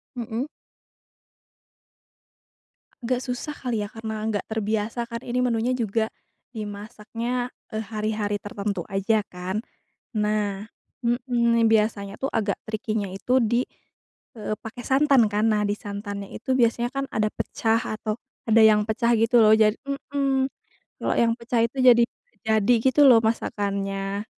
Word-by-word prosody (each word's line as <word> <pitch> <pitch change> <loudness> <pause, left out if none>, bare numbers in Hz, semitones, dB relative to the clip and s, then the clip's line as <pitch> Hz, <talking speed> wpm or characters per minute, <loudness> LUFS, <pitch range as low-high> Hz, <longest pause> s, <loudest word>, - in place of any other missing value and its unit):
Mhm. 235 +2 -3 2.6
Agak 245 +1 0
susah 250 +3 -4
kali, 235 -5 -2
ya? 205 - -5
Karena 220 -1 -5
enggak 215 -2 -2
terbiasa 220 +2 -2
kan, 230 - -3
ini 250 +1 0
menunya 240 +1 +1
juga, 225 -2 0 0.5
dimasaknya, 220 +4 -4 0.2
eee, 220 - -1
hari-hari 215 -1 -2
tertentu 205 -4 -4
aja, 205 +1 0
kan. 180 +2 -4 0.6
Nah 210 -1 0 0.4
mhm, 235 -1 +2
biasanya 210 -2 +1
tuh, 270 - -1
agak 205 -2 0
tricky-nya 215 -2 -2
itu 250 +6 +2
di, 235 +1 +2 0.8
eee, 215 0 -2
pakai 225 +2 -8
santan 270 -3 +4
kan. 210 +1 +1
Nah, 210 0 +1
di 205 - 0
santannya 200 -1 -6
itu 260 +3 -1
biasanya 235 +1 +2
kan 275 0 -1
ada 215 0 +1
pecah, 225 0 0
atau 215 0 -3 0.4
ada 225 - +6
yang 215 -1 +6
pecah 235 +2 +2
gitu 235 +1 +4
loh. 215 0 +6
Ja 215 -1 +6 0.2
mhm, 275 -1 -1 0.5
kalo - - +1
yang 230 -1 +4
pecah 235 0 0
itu 250 +4 -7
jadi 240 -2 +7 0.4
jadi 220 +2 +3
gitu 270 +1 +6
loh 230 -2 +8
masakannya. 200 -2 -2
220 Hz, 135 wpm, -25 LUFS, 210-240 Hz, 2.6 s, loh